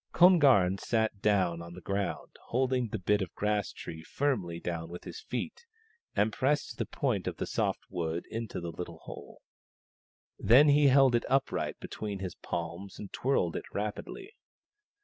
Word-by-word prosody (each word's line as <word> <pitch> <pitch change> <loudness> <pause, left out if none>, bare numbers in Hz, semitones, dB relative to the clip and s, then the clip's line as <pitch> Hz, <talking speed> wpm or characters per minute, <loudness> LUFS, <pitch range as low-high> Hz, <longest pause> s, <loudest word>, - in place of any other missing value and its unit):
Kon 180 +1 +7
garn 100 - +5
sat 110 -3 0
down 90 -5 +2
on 85 0 -9
the - - -8
ground, 100 +1 -3
holding 125 0 +1
the 110 - -3
bit 105 +2 +1
of 90 -2 -3
grass 105 -1 0
tree 80 - -8
firmly 95 - -1
down 85 -1 -4
with 90 +1 -8
his - - -8
feet, 470 +2 -5 0.5
and 105 +1 +2
pressed 145 +5 0
the - - -1
point - - -1
of - - -3
the - - -2
soft - - -1
wood 85 -2 -3
into 115 -3 -4
the 85 -1 -5
little 85 0 -7
hole. - - -10 1.0
Then 135 +6 +7
he 145 0 +6
held 135 -1 +6
it 120 - +2
upright 135 +1 0
between 105 -2 -5
his 95 -3 -5
palms 85 +3 -5
and 100 - -9
twirled 120 -11 +1
it - - -4
rapidly. 105 - -4
105 Hz, 170 wpm, -30 LUFS, 90-130 Hz, 1.0 s, Kon